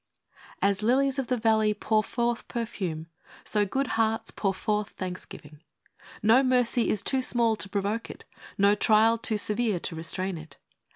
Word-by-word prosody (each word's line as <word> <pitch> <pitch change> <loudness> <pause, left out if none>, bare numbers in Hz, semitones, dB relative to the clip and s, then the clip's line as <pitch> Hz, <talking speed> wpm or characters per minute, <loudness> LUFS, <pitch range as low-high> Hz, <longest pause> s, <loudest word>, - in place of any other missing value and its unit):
A 200 0 +4
S 195 - -7
lilies 270 +4 +2
of 265 - -2
the 250 - 0
valley 220 -2 +2
pour 215 +1 +1
forth 235 +1 -2
perfume, 190 -9 -4 0.4
so 205 -1 +1
good 270 +7 -1 0.2
hearts 225 0 0
pour 195 - -1
forth 210 +2 -2
thanksgiving. 180 -5 -8 0.6
No 225 +5 +6
mercy 250 -2 +2
is 210 - 0
too 265 -1 +1
small 235 -3 +2
to 200 - -2
provoke 205 +3 -2
it, - - -10 0.3
no 200 +1 +4
trial 220 +2 +3
too 220 -1 0
severe 210 -2 0
to 165 - -4
restrain 170 +3 -2
it. 160 0 -13
215 Hz, 165 wpm, -27 LUFS, 195-235 Hz, 0.6 s, No